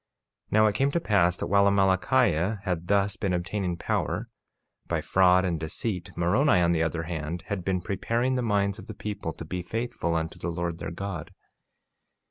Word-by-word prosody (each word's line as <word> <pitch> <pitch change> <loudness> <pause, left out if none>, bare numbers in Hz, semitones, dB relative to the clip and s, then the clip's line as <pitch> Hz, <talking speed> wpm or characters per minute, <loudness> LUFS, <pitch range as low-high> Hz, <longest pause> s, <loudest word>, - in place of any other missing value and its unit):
48:7 - - -37
Now 110 +1 +6
it 105 - +3
came 135 +7 +2
to 170 - +2
pass 95 - +2
that - - -3
while 100 0 +4
Amalickiah 95 0 +2
had 90 -3 -2
thus 100 +2 +2
been 100 -5 -1
obtaining 90 0 -2
power 95 +7 -2 0.6
by - - 0
fraud 95 0 +4
and 85 -3 -1
deceit, 90 +4 -3
Moroni, 100 - +3
on 85 -1 +3
the 80 -2 +1
other 80 0 -1
hand, 85 0 -4
had 100 -4 -2
been 90 0 0
preparing 115 +7 -1
the 130 - 0
minds 100 -2 0
of 95 - -11
the 110 - -7
people 105 -6 -4
to 80 - -8
be 90 +3 -4
faithful 115 -3 -2
unto 80 0 -3
the 85 - -3
Lord 85 0 -3
their - - -4
God. 85 -2 -5
95 Hz, 190 wpm, -27 LUFS, 85-105 Hz, 0.6 s, Now